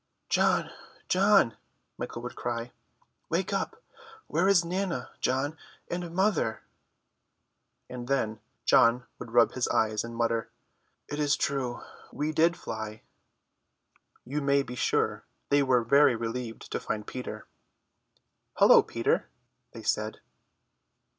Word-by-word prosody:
"John, -, -, +2 dB, 0.4 s
John," 195 Hz, -, +4 dB, 0.4 s
Michael 120 Hz, -, -6 dB
would 120 Hz, -, -6 dB
cry, 120 Hz, 0 st, -3 dB, 0.6 s
"wake 180 Hz, +4 st, 0 dB
up! 455 Hz, -, -3 dB, 0.4 s
Where 180 Hz, +3 st, +1 dB
is 185 Hz, -4 st, +5 dB
Nana, 185 Hz, +1 st, -2 dB
John, 140 Hz, +5 st, -1 dB, 0.3 s
and 175 Hz, 0 st, -3 dB
mother?" 190 Hz, -, +1 dB, 1.2 s
And 125 Hz, -1 st, -7 dB
then 110 Hz, -5 st, 0 dB, 0.3 s
John 125 Hz, -2 st, +5 dB
would -, -, -7 dB
rub 120 Hz, 0 st, +5 dB
his 130 Hz, -, -1 dB
eyes 110 Hz, -1 st, +1 dB
and 115 Hz, 0 st, -7 dB
mutter, 115 Hz, -1 st, 0 dB, 0.6 s
"It 145 Hz, -, -5 dB
is 145 Hz, -1 st, +3 dB
true, 135 Hz, -4 st, -2 dB, 0.3 s
we 150 Hz, +2 st, -2 dB
did 165 Hz, +2 st, +3 dB
fly." 110 Hz, -1 st, -6 dB, 1.2 s
You 145 Hz, +4 st, -2 dB
may 140 Hz, 0 st, +3 dB
be 125 Hz, -, -8 dB
sure 125 Hz, -, 0 dB, 0.3 s
they 145 Hz, 0 st, +4 dB
were 130 Hz, -3 st, +3 dB
very 140 Hz, +2 st, +5 dB
relieved 115 Hz, 0 st, -5 dB
to -, -, -1 dB
find 105 Hz, -1 st, -4 dB
Peter. 110 Hz, -4 st, -6 dB, 1.1 s
"Hullo, -, -, +8 dB
Peter," -, -, 0 dB, 0.4 s
they -, -, -10 dB
said. -, -, -1 dB
130 Hz, 120 wpm, -28 LUFS, 115-155 Hz, 1.2 s, Hullo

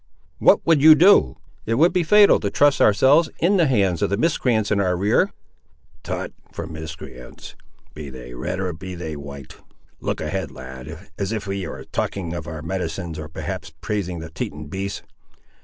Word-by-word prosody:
"What -, -, +4 dB
would 165 Hz, -4 st, +4 dB
you 155 Hz, +1 st, +9 dB
do? 165 Hz, -, +5 dB, 0.3 s
It 115 Hz, -, +1 dB
would 165 Hz, +7 st, +4 dB
be 180 Hz, -, +2 dB
fatal 205 Hz, +5 st, +6 dB
to 100 Hz, -, -2 dB
trust 145 Hz, +5 st, +3 dB
ourselves 135 Hz, +10 st, +5 dB
in 195 Hz, +4 st, +2 dB
the 170 Hz, -4 st, +4 dB
hands 100 Hz, -9 st, +1 dB
of -, -, +1 dB
the 100 Hz, -, 0 dB
miscreants 115 Hz, -7 st, +1 dB
in 100 Hz, -, +2 dB
our 90 Hz, -2 st, +1 dB
rear." 100 Hz, +4 st, +2 dB, 0.7 s
"Tut, -, -, -5 dB, 0.2 s
for 85 Hz, -, -6 dB
miscreants, 80 Hz, -6 st, -9 dB, 0.4 s
be 75 Hz, -2 st, -8 dB
they 60 Hz, -2 st, -10 dB
red 65 Hz, +9 st, -4 dB
or 90 Hz, -2 st, -2 dB
be 95 Hz, +3 st, -8 dB
they 80 Hz, -3 st, -5 dB
white. 70 Hz, -2 st, -10 dB, 0.4 s
Look -, -, -3 dB
ahead, 95 Hz, -5 st, -3 dB
lad, 65 Hz, +7 st, -10 dB
as 100 Hz, 0 st, -2 dB
if 110 Hz, -2 st, -3 dB
ye 95 Hz, -2 st, -3 dB
were -, -, -7 dB
talking 85 Hz, -4 st, -3 dB
of 85 Hz, -2 st, -6 dB
our 80 Hz, -1 st, -6 dB
medicines, 85 Hz, -2 st, -4 dB
or 75 Hz, -, -6 dB
perhaps 80 Hz, -, -6 dB
praising 100 Hz, -5 st, -3 dB
the 80 Hz, 0 st, -8 dB
Teton 75 Hz, -2 st, -6 dB
beasts. 100 Hz, +3 st, -4 dB
95 Hz, 180 wpm, -22 LUFS, 80-110 Hz, 0.7 s, you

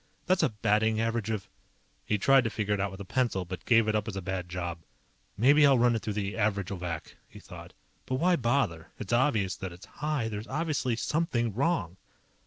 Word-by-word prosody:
That's 185 Hz, 0 st, +2 dB
a -, -, +3 dB
batting 110 Hz, 0 st, +1 dB
average 115 Hz, -1 st, -1 dB
of_ 110 Hz, -3 st, -2 dB, 0.6 s
He 105 Hz, -2 st, +2 dB
tried 135 Hz, +6 st, +5 dB
to -, -, +1 dB
figure 105 Hz, -2 st, -1 dB
it 100 Hz, -, -1 dB
out 100 Hz, +1 st, 0 dB
with 95 Hz, +1 st, -10 dB
a -, -, -7 dB
pencil, 115 Hz, -4 st, 0 dB
but 90 Hz, +1 st, -7 dB
gave 115 Hz, -2 st, +5 dB
it 110 Hz, -, +1 dB
up 105 Hz, +1 st, 0 dB
as 110 Hz, -, -4 dB
a 95 Hz, -, -3 dB
bad 95 Hz, -1 st, -4 dB
job. 85 Hz, -1 st, -4 dB, 0.6 s
Maybe 140 Hz, +7 st, +5 dB
I'll 140 Hz, -2 st, +6 dB
run 120 Hz, 0 st, +4 dB
it 110 Hz, -, -2 dB
through 105 Hz, -, -3 dB
the 100 Hz, -1 st, -2 dB
Averagovac, 100 Hz, -5 st, -2 dB, 0.2 s
he -, -, -12 dB
thought. -, -, -11 dB, 0.3 s
_But 130 Hz, -, -1 dB
why 180 Hz, +5 st, +3 dB
bother? 115 Hz, -, 0 dB
It's 110 Hz, +2 st, -5 dB
obvious 120 Hz, -7 st, +2 dB
that 95 Hz, -2 st, -5 dB
it's 85 Hz, +2 st, -12 dB
high. 150 Hz, -6 st, -2 dB
There's 105 Hz, 0 st, -5 dB
obviously 145 Hz, -4 st, -1 dB
SOMETHING 120 Hz, -5 st, -1 dB
WRONG. 110 Hz, -, 0 dB
110 Hz, 205 wpm, -29 LUFS, 95-130 Hz, 0.6 s, I'll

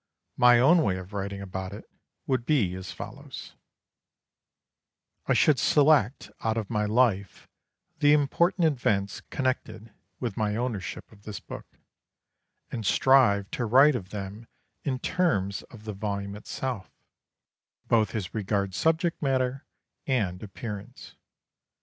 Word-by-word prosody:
My 125 Hz, -1 st, +7 dB
own 160 Hz, +7 st, +6 dB
way 95 Hz, -11 st, +1 dB
of 95 Hz, +2 st, -9 dB
writing 100 Hz, 0 st, -4 dB
about 95 Hz, 0 st, -5 dB
it 105 Hz, -, -10 dB, 0.4 s
would 130 Hz, -2 st, 0 dB
be 120 Hz, -10 st, +2 dB
as 95 Hz, 0 st, -6 dB
follows: -, -, -9 dB, 1.7 s
I -, -, +3 dB
should 145 Hz, -5 st, +4 dB
select 145 Hz, -4 st, +3 dB
out 110 Hz, 0 st, 0 dB
of 110 Hz, -2 st, -3 dB
my 105 Hz, -2 st, +1 dB
life 105 Hz, -4 st, +1 dB, 0.5 s
the 145 Hz, -1 st, +5 dB
important 165 Hz, +5 st, +3 dB
events 105 Hz, -9 st, 0 dB
connected 130 Hz, -5 st, -3 dB, 0.3 s
with 120 Hz, -6 st, -4 dB
my 105 Hz, -1 st, 0 dB
ownership 115 Hz, -5 st, -4 dB
of 105 Hz, -2 st, -18 dB
this 105 Hz, -1 st, -7 dB
book, -, -, -9 dB, 1.0 s
and 115 Hz, -, -4 dB
strive 105 Hz, -3 st, +4 dB
to 120 Hz, -, -2 dB
write 135 Hz, +6 st, +6 dB
of 95 Hz, -6 st, -5 dB
them 105 Hz, +2 st, -7 dB, 0.4 s
in 135 Hz, -3 st, -1 dB
terms 125 Hz, -, 0 dB
of 110 Hz, -3 st, -13 dB
the 110 Hz, -1 st, -5 dB
volume 100 Hz, 0 st, -4 dB
itself, 110 Hz, 0 st, -5 dB, 1.0 s
both 110 Hz, -1 st, +2 dB
as 100 Hz, -5 st, -4 dB
regards 100 Hz, -3 st, -1 dB
subject 165 Hz, +1 st, +1 dB
matter 135 Hz, 0 st, 0 dB, 0.4 s
and 100 Hz, -9 st, 0 dB
appearance. 105 Hz, 0 st, -8 dB
110 Hz, 130 wpm, -27 LUFS, 100-130 Hz, 1.7 s, My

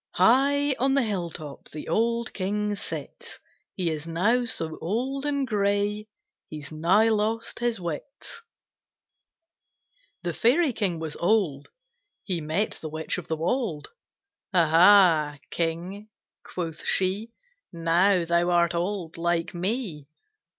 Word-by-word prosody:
"High 275 Hz, +8 st, +4 dB
on 270 Hz, +2 st, +2 dB
the 275 Hz, -, +3 dB
hill 190 Hz, -6 st, -1 dB
top 150 Hz, -3 st, -9 dB
The 150 Hz, -, -8 dB
old 235 Hz, +6 st, 0 dB
King 205 Hz, +2 st, -1 dB
sits; -, -, -7 dB, 0.4 s
He 180 Hz, -4 st, -1 dB
is 155 Hz, 0 st, -5 dB
now 210 Hz, +9 st, +1 dB
so 160 Hz, -8 st, -3 dB
old 260 Hz, -, -2 dB
and 280 Hz, -2 st, 0 dB
gray 205 Hz, -1 st, 0 dB, 0.4 s
He's 150 Hz, -2 st, -8 dB
nigh 180 Hz, +8 st, +3 dB
lost 220 Hz, +1 st, -1 dB
his 240 Hz, -3 st, 0 dB
wits." 175 Hz, -, -7 dB, 1.8 s
THE 175 Hz, -1 st, -2 dB
Fairy 265 Hz, -, +3 dB
King 190 Hz, -6 st, 0 dB
was 160 Hz, -2 st, -5 dB
old. 170 Hz, -8 st, +1 dB, 0.5 s
He 180 Hz, -4 st, -2 dB
met 160 Hz, +8 st, -2 dB
the 155 Hz, -, -5 dB
Witch 160 Hz, +3 st, -3 dB
of 175 Hz, -, -10 dB
the 160 Hz, -, -2 dB
Wold. 170 Hz, -, -2 dB, 0.6 s
"Ah 170 Hz, -5 st, +3 dB
ha, 165 Hz, -4 st, +6 dB
King!" 175 Hz, +5 st, -3 dB, 0.3 s
quoth 165 Hz, -3 st, -6 dB
she, 195 Hz, +4 st, +1 dB, 0.4 s
"Now 170 Hz, +2 st, +2 dB
thou 170 Hz, +1 st, +2 dB
art 170 Hz, -1 st, +3 dB
old 175 Hz, -1 st, -3 dB
like 170 Hz, +1 st, -1 dB
me." 180 Hz, -, -3 dB
185 Hz, 130 wpm, -26 LUFS, 165-220 Hz, 1.8 s, ha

